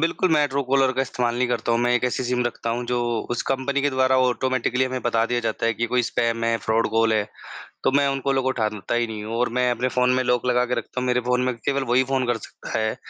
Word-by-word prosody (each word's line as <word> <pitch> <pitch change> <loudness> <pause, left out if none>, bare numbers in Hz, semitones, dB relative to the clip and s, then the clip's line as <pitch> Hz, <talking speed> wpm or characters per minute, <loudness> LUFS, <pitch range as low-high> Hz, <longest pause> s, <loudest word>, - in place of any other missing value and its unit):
बिल्कुल, 165 +2 +1
मैं 150 -1 +4
ट्रूकॉलर 135 -1 +1
का 135 +1 0
इस्तेमाल 120 -2 -1
नहीं 125 0 +1
करता 120 -1 -1
हूँ 115 - +2
मैं 120 0 +2
एक 125 0 +1
ऐसी 125 +1 -1
सिम 125 0 0
रखता 115 -1 -3
हूँ 120 +1 -2
जो 125 -1 0 0.3
उस 120 - -1
कंपनी 135 +1 0
के 145 - +2
द्वारा 130 0 +2
ऑटोमैटिकली 130 0 +1
हमें 130 0 -3
बता 115 -1 +1
दिया 120 0 -1
जाता 115 0 -2
है 115 - +1
कि 120 - -1
कोई 125 +1 +1
स्पैम 115 0 -1
है, 115 0 +2
फ्रॉड 110 +2 0
कॉल 115 0 +2
है। 105 -1 +2 0.6
तो - - +3
मैं 140 0 +3
उन 135 0 -1
कॉलों 135 -1 +2
को 130 - +1
उठाता 110 -2 -2
ही 120 -1 +1
नहीं 105 -1 -6
हूँ 110 +2 -5
और 125 +1 +1
मैं 125 0 +2
अपने 120 +2 -1
फ़ोन 125 0 +1
में 130 - +1
लॉक 125 0 +1
लगा 125 0 +2
के 125 - -1
रखता 125 - -4
हूँ, 125 - -2
मेरे 125 0 +2
फ़ोन 125 +1 0
में 130 - 0
केवल 140 +4 -1
वही 125 +2 +4
फ़ोन 130 0 -1
कर 120 -2 +1
सकता 110 - -7
है 110 0 -1
125 Hz, 275 wpm, -23 LUFS, 115-130 Hz, 0.6 s, मैं